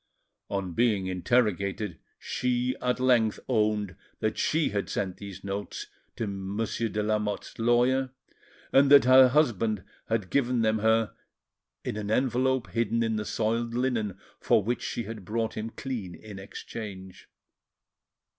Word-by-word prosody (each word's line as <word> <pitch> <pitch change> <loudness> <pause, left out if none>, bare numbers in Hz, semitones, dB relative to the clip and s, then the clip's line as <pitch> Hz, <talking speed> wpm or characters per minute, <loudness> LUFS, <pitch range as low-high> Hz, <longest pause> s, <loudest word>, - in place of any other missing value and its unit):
On 100 -3 -2
being 105 -3 +2
interrogated, 100 -1 0 0.2
she 125 0 -1
at 125 0 0
length 120 -4 +3
owned 105 -5 +1 0.2
that 110 0 0
she 160 0 +1
had 100 -1 -2
sent 95 -2 -2
these 100 -2 -9
notes 100 +1 -4 0.3
to 115 - -2
Monsieur 100 +3 -2
de 105 0 -1
Lamotte's 105 0 -2
lawyer, 125 +3 +3 0.6
and 135 +1 +6
that 140 -1 +9
her 130 0 +8
husband 115 -8 +1 0.3
had 110 -5 -1
given 125 -4 +2
them 110 0 +2
her 110 0 +2 0.7
in - - -3
an 105 -1 -4
envelope 130 +1 +1
hidden 115 0 +1
in 110 -1 0
the 105 - -3
soiled 115 +2 -1
linen 115 -6 0 0.2
for 105 - +3
which 120 +4 -1
she 120 - -3
had 110 -1 -7
brought 115 +3 -2
him 110 +1 -3
clean 115 -8 -5
in 105 -3 -10
exchange. 95 -1 -8
110 Hz, 140 wpm, -28 LUFS, 100-120 Hz, 0.7 s, that